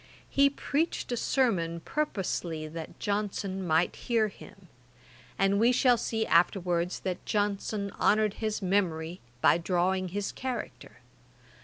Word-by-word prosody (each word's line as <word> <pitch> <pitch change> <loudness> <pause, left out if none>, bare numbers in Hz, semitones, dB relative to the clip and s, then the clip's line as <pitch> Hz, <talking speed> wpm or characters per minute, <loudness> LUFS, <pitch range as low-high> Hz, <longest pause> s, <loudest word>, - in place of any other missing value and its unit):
He 280 0 +5
preached 285 +1 -2
a - - +1
sermon 195 -10 +1
purposely 180 - -2
that 160 0 -8
Johnson 200 -2 -2
might 160 +2 +2
hear 225 -3 +1
him; 195 -1 -15 0.7
and 195 +1 +3
we 235 +3 +5
shall 250 0 +4
see 225 -1 -1
afterwards 175 +1 +2
that 185 -2 -3
Johnson 205 0 -1
honoured 215 -1 +3
his 215 -2 -2
memory 180 -3 0 0.2
by - - +5
drawing 185 +2 +1
his 200 +3 -3
character. 255 -2 -6
195 Hz, 125 wpm, -29 LUFS, 175-220 Hz, 0.7 s, He